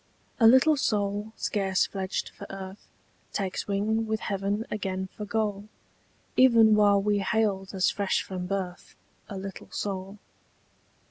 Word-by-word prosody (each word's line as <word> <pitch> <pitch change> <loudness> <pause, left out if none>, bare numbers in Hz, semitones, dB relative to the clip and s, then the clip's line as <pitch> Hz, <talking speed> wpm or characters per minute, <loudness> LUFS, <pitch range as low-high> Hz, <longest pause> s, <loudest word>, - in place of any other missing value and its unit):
A 225 - +7
LITTLE 260 +6 +6
soul 205 -3 -1
scarce 190 -3 +1
fledged 190 -1 -3
for - - -11
earth 195 0 -8 0.5
Takes 195 0 -2
wing 215 +3 0
with 220 0 -1
heaven 200 +2 -2
again 190 -2 -3
for 210 - -5
goal 205 -1 -1 0.7
Even 230 -4 +6
while 205 -1 +5
we 205 +1 +1
hailed 195 -1 0
as 185 -1 +3
fresh 200 -2 0
from 180 -1 -5
birth 185 -2 -4 0.3
A 200 - -5
little 195 0 -8
soul. 195 0 -4
200 Hz, 135 wpm, -27 LUFS, 195-215 Hz, 0.7 s, A